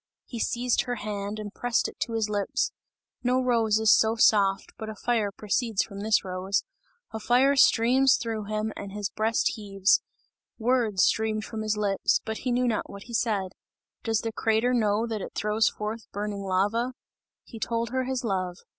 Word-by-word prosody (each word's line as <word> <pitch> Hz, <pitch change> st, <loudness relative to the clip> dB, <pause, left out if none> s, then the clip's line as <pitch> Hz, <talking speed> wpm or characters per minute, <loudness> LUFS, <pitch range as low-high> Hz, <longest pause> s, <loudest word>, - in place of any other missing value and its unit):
He 235 Hz, -, -7 dB
seized 245 Hz, +1 st, +1 dB
her 245 Hz, -, -2 dB
hand 205 Hz, -1 st, -4 dB
and 210 Hz, -1 st, -7 dB
pressed 245 Hz, -1 st, 0 dB
it -, -, -11 dB
to 230 Hz, -, -2 dB
his 225 Hz, -1 st, 0 dB
lips 205 Hz, -2 st, -1 dB, 0.5 s
no 250 Hz, +1 st, +2 dB
rose 230 Hz, -4 st, +2 dB
is 220 Hz, -1 st, +5 dB
so 220 Hz, +1 st, +2 dB
soft, 200 Hz, -3 st, +3 dB
but 220 Hz, -, -5 dB
a 215 Hz, -, -6 dB
fire 220 Hz, -2 st, 0 dB
proceeds 215 Hz, +1 st, 0 dB
from 200 Hz, -2 st, -9 dB
this 215 Hz, 0 st, +2 dB
rose 185 Hz, +2 st, -1 dB, 0.5 s
a 220 Hz, -, -5 dB
fire 255 Hz, +5 st, +3 dB
streams 260 Hz, +1 st, +5 dB
through 225 Hz, -3 st, -4 dB
him 215 Hz, +1 st, -2 dB
and 195 Hz, -1 st, -7 dB
his 205 Hz, -1 st, -3 dB
breast 220 Hz, +1 st, +1 dB
heaves; 195 Hz, -2 st, +1 dB, 0.6 s
words 230 Hz, -5 st, +2 dB
streamed 220 Hz, -1 st, +1 dB
from 220 Hz, -1 st, -5 dB
his 215 Hz, 0 st, -1 dB
lips, 200 Hz, -2 st, +1 dB
but 220 Hz, 0 st, -4 dB
he 250 Hz, -, -2 dB
knew 250 Hz, +1 st, +2 dB
not 225 Hz, -3 st, -1 dB
what 200 Hz, 0 st, -9 dB
he 235 Hz, -, -11 dB
said. 210 Hz, -5 st, 0 dB, 0.5 s
Does 225 Hz, -2 st, 0 dB
the 225 Hz, -, -3 dB
crater 225 Hz, +3 st, +1 dB
know 215 Hz, -2 st, +2 dB
that 220 Hz, -3 st, -4 dB
it -, -, -8 dB
throws 210 Hz, +1 st, +2 dB
forth 215 Hz, +2 st, -6 dB
burning 205 Hz, 0 st, -4 dB
lava? 205 Hz, +6 st, 0 dB, 0.5 s
He 225 Hz, -, -11 dB
told 230 Hz, 0 st, -2 dB
her 260 Hz, 0 st, -1 dB
his 260 Hz, 0 st, -2 dB
love. 185 Hz, -5 st, -2 dB
220 Hz, 185 wpm, -27 LUFS, 205-235 Hz, 0.6 s, is